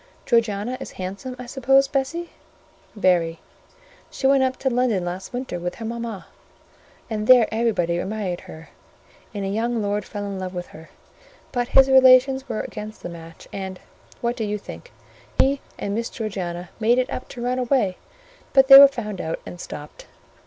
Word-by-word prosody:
"Georgiana 230 +1 0
is - - -8
handsome, 195 +8 -6
I 250 - -8
suppose, 270 +2 +3
Bessie?" 295 +6 -2 0.6
"Very. 175 -5 +2 0.7
She - - -6
went 270 0 +5
up 260 0 0
to 265 - 0
London 235 -7 +1
last 180 +2 -5
winter 250 -8 -4
with 175 +1 -4
her 225 - -7
mama, 230 -3 -5 0.8
and 215 -2 -3
there 250 -3 +7
everybody 210 -7 0
admired 195 -3 -3
her, 160 +1 -12 0.6
and 200 -2 -4
a - - -2
young 230 +3 -1
lord 205 0 -1
fell 205 +1 -6
in 200 -1 -5
love 185 0 -5
with 175 0 -4
her: 160 +1 -13 0.6
but 245 -1 -1
his 270 +1 +6
relations 265 0 +5
were 225 - -2
against 215 0 -8
the - - -5
match; 165 -1 -11
and—what 195 +5 -6
do 230 - -3
you 210 0 -2
think?—he 270 +6 -4 0.2
and 200 - -3
Miss 230 +2 -2
Georgiana 180 -5 -5
made 230 +2 +3
it 255 0 0
up - - -6
to 240 - -7
run 250 +1 0
away; 245 -7 +1 0.6
but 270 0 +5
they 270 0 +13
were 280 - +11
found 210 -8 -5
out 160 +1 -3
and 175 - -9
stopped. 150 0 -9
220 Hz, 170 wpm, -23 LUFS, 190-255 Hz, 0.8 s, they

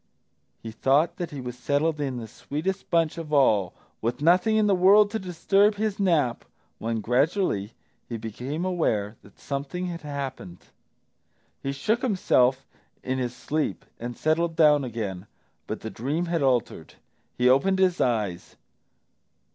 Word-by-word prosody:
He 115 - -6
thought 135 +8 +2
that 175 -2 -4
he 145 - -7
was 125 -1 -6
settled 145 +5 0
in 135 -3 -2
the 115 -2 -6
sweetest 175 - -4
bunch 165 -2 +1
of 155 -2 -7
all, 110 - +3 0.3
with 120 +2 -2
nothing 180 +8 +3
in 215 - +3
the 205 - +3
world 200 +3 +5
to 220 - -2
disturb 195 +3 +2
his 210 -1 -2
nap, 165 -11 +1 0.4
when 115 0 -2
gradually 125 - 0 0.4
he 115 - -3
became 125 - -5
aware 110 - -1
that 100 - -19
something 140 +6 -4
had 170 -2 -5
happened. 135 - -6 1.0
He 135 - -2
shook 215 - 0
himself 135 - +2 0.4
in 130 +1 -2
his 125 -1 -3
sleep 155 +3 -2
and 120 0 -6
settled 165 +1 +1
down 150 -3 +5
again, 105 -6 -5 0.4
but - - -5
the 110 - -6
dream 145 +9 -2
had 170 -2 -1
altered. 125 - 0 0.4
He 125 - +3
opened 140 +10 +4
his 185 -2 +2
eyes. 105 -8 -1
145 Hz, 150 wpm, -26 LUFS, 120-175 Hz, 1.0 s, world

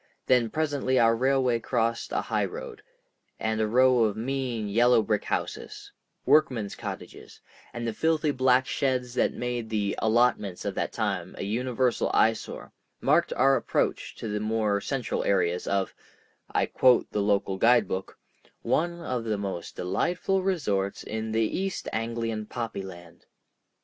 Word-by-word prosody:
Then 125 -3 +3
presently 145 -2 0
our 115 -1 +5
railway 130 -1 +2
crossed 115 0 -1
a - - 0
high - - 0
road, 460 -2 -8 0.6
and 110 0 -1
a 110 - +1
row 125 +1 +4
of 105 -1 -1
mean 125 -2 -2
yellow 120 +2 +4
brick 105 0 -1
houses—workmen's 125 -9 -1
cottages, - - -8 0.3
and 120 -1 -4
the 115 - -2
filthy 160 +3 +1
black 130 -1 +3
sheds 130 -3 -1
that - - +1
made 120 -2 -3
the 105 -2 0
"allotments" 110 -4 +1
of - - -1
that - - -2
time - - -2
a - - -4
universal 125 +3 0
eyesore, 110 0 0 0.3
marked - - +2
our 135 +1 +4
approach - - -1
to - - -6
the 105 0 -2
more 110 -1 0
central 135 -1 -2
areas 90 -2 +1
of—I 100 -1 -3
quote 125 -2 +3
the 105 - 0
local 100 -1 +1
guidebook—"one 120 - 0
of 125 -6 -3
the 110 -2 -1
most 95 -4 -5
delightful 175 - 0
resorts 105 - -1
in 110 0 -4
the 110 +1 +2
East 190 - -3
Anglian 115 -1 -2
poppy 115 -4 -4
land." 85 -3 -12
115 Hz, 140 wpm, -27 LUFS, 105-130 Hz, 0.6 s, our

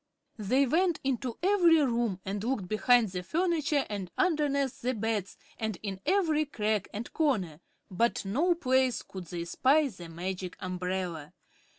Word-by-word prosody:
They 255 +7 +2
went 340 +5 +2
into 260 -2 -2
every 360 -4 +5
room 235 - 0
and 200 +1 -3
looked 230 -6 -1
behind 225 +2 +3
the 180 -1 -3
furniture 310 - 0
and 200 -4 -5
underneath 290 -7 +1
the 255 +1 -1
beds 215 -3 -2 0.2
and 220 -4 -2
in 195 -2 -4
every 320 -6 +2
crack 215 -7 -1
and 220 +4 -6
corner, 205 - 0 0.3
but 230 +3 0
no 310 - +2
place 260 -5 +1
could 185 -2 -9
they 170 0 -5
spy 280 - +3
the 175 -6 -10
Magic 180 +2 -5
Umbrella. 180 -4 -4
235 Hz, 150 wpm, -29 LUFS, 190-290 Hz, 0.3 s, every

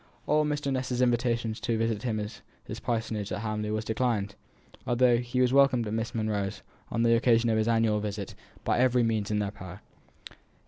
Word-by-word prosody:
All 150 0 +2
Mr. 145 -2 -1
Ness's 125 -1 -2
invitations 120 -2 +1
to 115 -2 -1
visit 115 -2 -1
him 110 -3 -1
at 105 +1 -6 0.2
his - - -6
parsonage 110 -4 -2
at 95 +2 -3
Hamley 105 -1 -2
were 110 0 -1
declined, 110 -3 -1 0.5
although 120 0 +4
he 120 +1 -1
was 125 0 +3
welcomed 135 -4 +4
at 105 - -4
Miss 115 +1 -3
Monro's, 105 -2 -2 0.3
on 115 - 0
the 115 0 +5
occasion 115 -1 +3
of 110 - +2
his 110 - 0
annual 115 -2 +2
visit, 105 -2 -4 0.3
by - - +1
every 125 -1 +3
means 110 -3 0
in 105 - 0
their 105 -1 -1
power. 95 -1 -10
115 Hz, 190 wpm, -28 LUFS, 105-125 Hz, 0.5 s, the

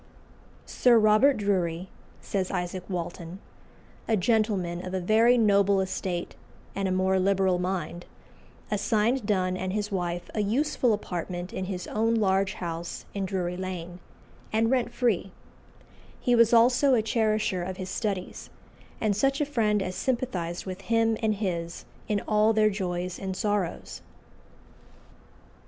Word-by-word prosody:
"Sir 245 -2 +4
Robert 220 +5 +5
Drury," 185 -4 -1 0.3
says 190 -2 -2
Isaac 180 0 -3
Walton, 175 -1 -5 0.7
"a 220 - +2
gentleman 190 -4 0
of 185 +1 -4
a - - 0
very 225 +6 +4
noble 200 -3 +4
estate 185 -2 -3 0.4
and 195 -1 -1
a - - -1
more 190 +1 +2
liberal 190 -1 +2
mind, 180 -2 -3 0.6
assigned 215 +3 +1
Donne 185 -3 +1
and 185 0 -3
his 210 0 -2
wife 175 -2 -2
a - - -2
useful 245 +4 +1
apartment 180 -3 -4
in 185 - -3
his 185 -2 -4
own 225 +2 0
large 195 -2 +2
house 170 -1 -5
in 200 -1 -2
Drury 180 -2 -2
Lane, 180 -1 -6 0.5
and 225 +2 +2
rent 250 -2 +1
free; 225 -6 0 0.9
he 245 - +1
was 230 -1 +5
also 250 +3 +5
a 220 - +2
cherisher 215 -4 0
of 185 +1 -5
his 185 -1 -5
studies, 200 -5 -4 0.5
and 215 -2 +1
such 275 +6 +1
a 295 - +2
friend 215 -7 +1
as 185 - -4
sympathised 185 -8 -2
with 185 0 -6
him 225 0 +2
and 215 -1 +1
his 170 -5 -4 0.2
in 210 -2 0
all 215 +1 +3
their 215 -1 +3
joys 180 -2 -3
and 190 -1 -4
sorrows." 205 -5 -2
195 Hz, 145 wpm, -27 LUFS, 185-220 Hz, 0.9 s, Robert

